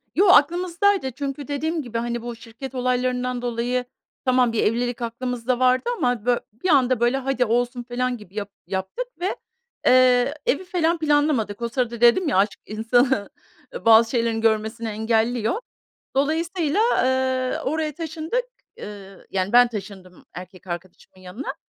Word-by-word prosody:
Yo, 395 +3 +4
aklımızdaydı. 350 -1 +3
Çünkü 275 +2 -5
dediğim 315 +3 -2
gibi, 235 -3 -5
hani, 235 0 -2
bu 240 0 -6
şirket 235 +3 -10
olaylarından 250 0 -1
dolayı, 245 +1 -1 0.4
tamam, 250 -2 +3
bir 225 - +1
evlilik 245 +2 0
aklımızda 245 +1 -2
vardı 255 - +3
ama, 245 -3 0
bö 245 -1 +3 0.3
bir 370 - +1
anda, 255 -5 +4
böyle, 240 +3 +2
"Hadi, 265 -2 0
olsun." 245 +2 0
felan 250 0 -2
gibi 210 -2 -16
yap 205 -1 -4 0.2
yaptık 190 - -3
ve, 370 +3 -1 0.5
eee, 255 +1 +5
evi 285 - +1
falan 345 -2 0
planlamadık. 290 -8 +1
O 235 - -1
sırada 240 -1 -2
dedim 240 +9 +5
ya, 250 - +1
aşk 200 +1 +1
insanı, 230 +1 +1 0.4
eee, - - -8
bazı 225 0 +7
şeylerini 230 -2 0
görmesini 225 +1 0
engelliyor. 225 - 0 0.6
Dolayısıyla, 325 +4 0 0.2
eee, 260 0 0
oraya 305 0 -1
taşındık, 325 +9 -3 0.4
ııı, 195 -2 -10
yani, 190 0 -1
ben 245 0 +7
taşındım 195 -4 -9
erkek 185 +1 -11
arkadaşımın 180 +1 -9
yanına, 195 +10 -6
245 Hz, 145 wpm, -23 LUFS, 225-280 Hz, 0.6 s, bazı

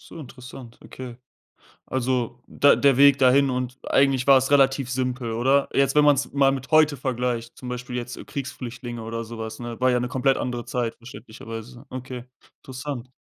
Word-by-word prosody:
so, - - -11
interessant, 125 -3 -11
okay. 125 -2 -9 0.7
Also, 125 -2 -2
der 145 - +4
der 140 -2 +4
Weg 140 0 +6
dahin 135 +1 +4
und 125 0 -3
eigentlich 135 -2 +2
war 135 -1 +7
es 135 +1 -2
relativ 135 -2 +3
simpel, 125 -2 -2
oder? 135 +5 +2
Jetzt, 135 -1 +2
wenn 150 0 +5
man 145 -1 +6
es 135 - -3
mal 135 -1 +3
mit 130 -2 -6
heute 155 -2 +4
vergleicht, 125 -2 -3
zum 125 - -9
Beispiel 125 0 -5
jetzt 120 0 -6
Kriegsflüchtlinge 120 -3 -6
oder 115 +1 -5
so 115 +1 -9
was, 110 0 -6
ne? 120 -1 -7
War 130 0 +4
ja 125 - +2
'ne 125 - -2
komplett 130 +1 +1
andere 120 -1 -3
Zeit, 120 -1 -2
verständlicherweise. 115 +1 -10
Okay, 125 -1 -7 0.4
interessant. 130 -1 -7
125 Hz, 180 wpm, -24 LUFS, 120-135 Hz, 0.7 s, war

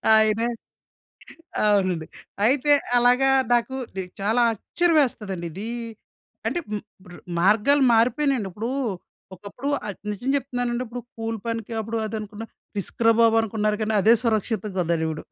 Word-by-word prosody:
ఆయనే 220 +1 +3 1.2
అవునండి. 185 -6 +2 0.4
అయితే 280 +4 +3 0.3
అలాగా 250 +2 +4 0.2
నాకు 240 +2 +1 0.2
నె 190 - -2 0.2
చాలా 220 +4 +2
ఆశ్చర్యం 330 - +1
యేస్తదండి. 195 -8 -4
ఇది 205 +5 -6 0.8
అంటే 345 - -1
హ్మ్. 210 -1 -3 0.2
ఇప్పుడు 180 -1 -13 0.2
మార్గాలు 225 +9 +4
మారిపెయినాయండి. 245 -1 +2
ఇప్పుడు 220 +6 -4 0.7
ఒకప్పుడు 205 +9 -8 0.2
అది 200 - -6
నిజం 225 +6 -4
చెప్తున్నానండి 245 -2 -2
ఇప్పుడు 245 +1 -6 0.2
కూలి 225 0 -3
పనికి 230 0 -3
అప్పుడు 225 +2 -4 0.2
అనుకున్నా 215 +1 -7 0.3
రిస్కురా 230 +4 +2
బాబు 225 0 +5
అనుకున్నారు. 215 -1 -1
గానీ 215 0 -1
అదే 225 +3 +6
సురక్షితం‌గా 215 -3 -1
ఉందిప్పుడు. 160 -2 -1
225 Hz, 125 wpm, -24 LUFS, 205-245 Hz, 1.2 s, అదే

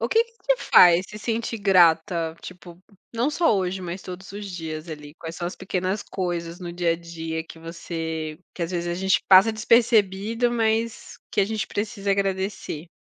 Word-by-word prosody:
o 230 - -1
que 455 - +4
que 465 - -25
te - - +1
faz 175 - +6
se 210 - -9
sentir 230 +1 -2
grata, 170 -3 +3
tipo, 175 -1 -11 0.4
não 235 +4 +1
só 315 -4 +2
hoje, 185 0 -2
mas 180 +1 -5
todos 185 +1 -9
os 205 0 -7
dias, 160 -2 -6
ali? 150 -1 -9
Quais 165 0 -7
são 175 - -3
as 180 - -5
pequenas 190 +1 -2
coisas 175 -2 -4
no 175 -2 -6
dia 175 -1 +1
a - - -2
dia 165 -1 -5
que 165 - -13
você 160 -1 -5 0.2
que, 175 - -4
às 165 - -2
vezes, 175 -1 -2
a 175 - -1
gente 190 0 +2
passa 195 +4 +7
despercebido, 225 0 +2
mas 225 -1 -1
que - - +1
a - - +4
gente 215 0 -3
precisa 205 -1 -3
agradecer? 195 -4 -2
185 Hz, 190 wpm, -24 LUFS, 170-210 Hz, 0.4 s, passa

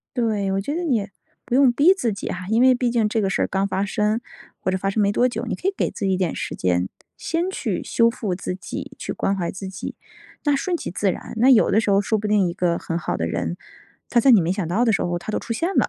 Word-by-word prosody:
对， 215 -5 0
我 195 - 0
觉 285 +10 -3
得 350 - -2
你 235 -11 0 0.4
不 250 - -1
用 265 -2 +6
逼 295 +10 +5
自 245 - -1
己 200 - -5
哈， 180 0 -4
因 225 +2 +3
为 255 0 +6
毕 245 0 0
竟 230 -3 +2
这 215 +1 0
个 195 - +1
事 - - 0
儿 - - 0
刚 195 0 0
发 195 0 -1
生 210 +2 0 0.4
或 - - -2
者 185 - 0
发 195 +1 -1
生 210 +2 0
没 200 - +3
多 245 +4 +3
久， 245 - -4
你 - - -2
可 - - -4
以 - - -5
给 - - +1
自 - - -7
己 190 - +2
一 - - +1
点 180 -3 -1
时 - - -4
间， 90 0 0 0.3
先 340 +2 -1
去 380 - -2
修 230 0 +3
复 215 -6 -3
自 180 - -4
己， 185 - -7
去 - - -4
关 195 - 0
怀 175 -3 -2
自 190 0 -6
己。 190 +1 -6 0.5
那 290 - +3
顺 350 +6 -1
其 335 - -5
自 195 +2 +1
然， - - -9
那 245 +4 +5
有 240 -5 +5
的 215 - +4
时 225 - 0
候 200 0 +4
说 215 +2 0
不 210 0 -3
定 210 -3 +3
一 - - -4
个 175 -1 0
很 165 - -3
好 - - -2
的 80 - -1
人， 85 0 -2 0.5
他 240 - +4
在 265 +3 +5
你 220 -6 +7
没 170 +2 0
想 190 -3 -2
到 195 +8 +1
的 235 - +3
时 200 - +1
候 175 0 -1
他 175 +5 -6
都 - - -1
出 230 - -4
现 335 +10 -1
了， - - +3
210 Hz, 315 characters per minute, -22 LUFS, 185-240 Hz, 0.5 s, 你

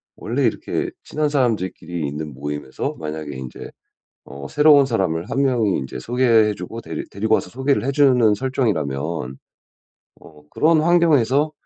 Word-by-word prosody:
원래 - - -2
이렇게 360 - -1
친한 150 0 -1
사람들끼리 95 - -1
있는 75 +1 -6
모임에서 70 0 -5
만약에 75 -2 -5
인제 65 -1 -8 0.6
어 70 0 -9
새로운 150 -2 +5
사람을 95 -9 -1
1 135 - 0
명이 120 -8 +1
인제 65 -1 -6
소개해 115 - +2
주고 100 +6 -7
데리 - - -6
데리고 110 +3 0
와서 - - -1
소개를 130 +1 0
해 135 - 0
주는 130 -6 +4
설정이라면 80 - -2 0.8
어 75 -2 -17
그런 160 0 +3
환경에서 155 -4 +3
110 Hz, 330 characters per minute, -21 LUFS, -, 0.8 s, 새로운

